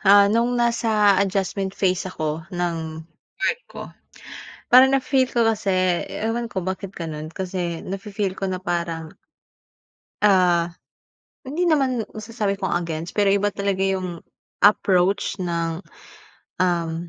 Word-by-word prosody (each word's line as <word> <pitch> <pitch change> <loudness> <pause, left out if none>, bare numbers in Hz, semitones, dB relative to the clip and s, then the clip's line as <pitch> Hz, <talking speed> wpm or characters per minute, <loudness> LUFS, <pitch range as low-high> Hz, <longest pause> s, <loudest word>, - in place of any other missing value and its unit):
Ah, 200 0 +6
nung 240 +2 +2
nasa 220 -4 +3
adjustment 195 0 -1
phase 185 -1 0
ako 160 0 -4
nung 160 -2 -3 0.3
work 480 - 0
ko. - - -10 0.9
Parang 255 +1 +9
na-feel 265 -1 +2
ko 235 -3 +1
kasi 220 -2 0 0.4
ewan 230 +2 -2
ko 190 -4 -4
bakit 190 +1 -4
gano'n 155 -2 -5
kasi 180 -1 -4
nafi-feel 195 0 -3
ko 195 - -1
na 185 - -2
parang 170 -3 -3 1.1
Ah, 175 -4 +3 0.7
hindi 300 +7 -2
naman 265 -8 +2
masasabi 215 -2 -2
kong 190 - -1
against 165 +1 -5
pero 200 -1 +4
iba 205 +1 +2
talaga 200 -1 -2
yung 185 -3 -1 0.4
approach 195 -1 +3
ng, 170 -1 -2 0.8
um, 170 -1 0
190 Hz, 125 wpm, -23 LUFS, 175-215 Hz, 1.1 s, Parang